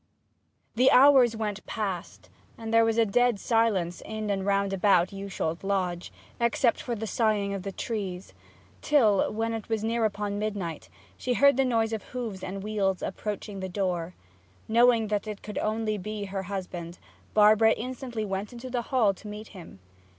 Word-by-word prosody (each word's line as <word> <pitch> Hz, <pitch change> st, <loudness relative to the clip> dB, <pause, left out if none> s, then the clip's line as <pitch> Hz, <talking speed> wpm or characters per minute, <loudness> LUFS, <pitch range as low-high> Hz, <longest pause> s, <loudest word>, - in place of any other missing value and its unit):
The 255 Hz, +3 st, +4 dB
hours 260 Hz, -3 st, +6 dB
went 210 Hz, -2 st, -3 dB
past, 175 Hz, -, -5 dB, 0.3 s
and 225 Hz, 0 st, -5 dB
there 230 Hz, 0 st, +6 dB
was 225 Hz, 0 st, +1 dB
dead 230 Hz, 0 st, +2 dB
silence 205 Hz, -8 st, +1 dB
in 215 Hz, -1 st, -4 dB
and 195 Hz, -1 st, -1 dB
round 200 Hz, 0 st, +1 dB
about 190 Hz, -2 st, +3 dB
Yewsholt 195 Hz, -4 st, -4 dB
Lodge, 185 Hz, -3 st, -2 dB, 0.3 s
except 235 Hz, +1 st, +2 dB
for 240 Hz, -, -3 dB
the 220 Hz, 0 st, -4 dB
soughing 215 Hz, -3 st, 0 dB
of 195 Hz, -, -4 dB
the 195 Hz, +1 st, -5 dB
trees; 195 Hz, -4 st, -5 dB, 0.5 s
till, 225 Hz, -10 st, +3 dB
when 225 Hz, +1 st, -2 dB
it 225 Hz, -1 st, -6 dB
was 220 Hz, -1 st, -1 dB
near 230 Hz, +1 st, 0 dB
upon 205 Hz, -1 st, -2 dB
midnight, 200 Hz, -7 st, -4 dB, 0.3 s
she 250 Hz, -, -1 dB
heard 280 Hz, +1 st, +5 dB
the 270 Hz, -, +3 dB
noise 225 Hz, -3 st, +1 dB
of 220 Hz, -, -2 dB
hoofs 225 Hz, -6 st, -6 dB
and 195 Hz, +1 st, -5 dB
wheels 200 Hz, -3 st, -1 dB
approaching 205 Hz, 0 st, -5 dB
the 190 Hz, 0 st, -4 dB
door. 180 Hz, -2 st, -2 dB, 0.5 s
Knowing 230 Hz, -1 st, +4 dB
that 210 Hz, 0 st, -1 dB
it 210 Hz, -2 st, -6 dB
could 210 Hz, -, -5 dB
only 215 Hz, -1 st, -1 dB
be 210 Hz, +2 st, -5 dB
her 195 Hz, 0 st, -4 dB
husband, 180 Hz, -3 st, -5 dB, 0.4 s
Barbara 215 Hz, +1 st, +6 dB
instantly 245 Hz, -2 st, -5 dB
went 195 Hz, +1 st, -4 dB
into 245 Hz, +1 st, -8 dB
the 245 Hz, -1 st, 0 dB
hall 235 Hz, -7 st, +3 dB
to 200 Hz, -, -13 dB
meet 210 Hz, +1 st, -8 dB
him. 175 Hz, -, -12 dB
210 Hz, 170 wpm, -27 LUFS, 195-230 Hz, 0.5 s, hours